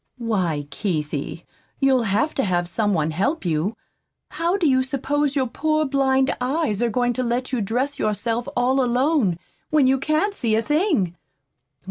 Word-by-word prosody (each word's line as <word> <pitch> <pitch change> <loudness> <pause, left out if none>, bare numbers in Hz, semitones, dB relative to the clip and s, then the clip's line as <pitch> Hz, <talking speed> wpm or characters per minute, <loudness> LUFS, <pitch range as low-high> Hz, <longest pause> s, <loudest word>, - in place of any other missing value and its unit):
"Why, 185 - -1
Keithie, 155 -4 -3 0.3
you'll 265 -3 +3
HAVE 225 +10 +1
to 270 - 0
have 175 -3 0
some 205 +3 0
one 155 -1 0
help 200 - -1
you. 170 +7 -1 0.5
How 340 +3 0
do 350 -5 +2
you 260 -2 +4
suppose 280 +2 -1
your 270 -2 +2
poor 310 +5 0
blind 270 -1 +2
eyes 260 -5 0
are 240 - +2
going 245 +2 +1
to 255 - -2
let 245 +2 -1
you 250 -4 0
dress 250 +8 -1
yourself 225 +3 -1
all 260 +2 +2
alone, 250 - +2 0.3
when 305 -3 +4
you 265 +1 +3
can't 310 +8 +1
see 230 - 0
a 225 - +1
thing? 295 - +1
250 Hz, 165 wpm, -22 LUFS, 205-280 Hz, 0.5 s, you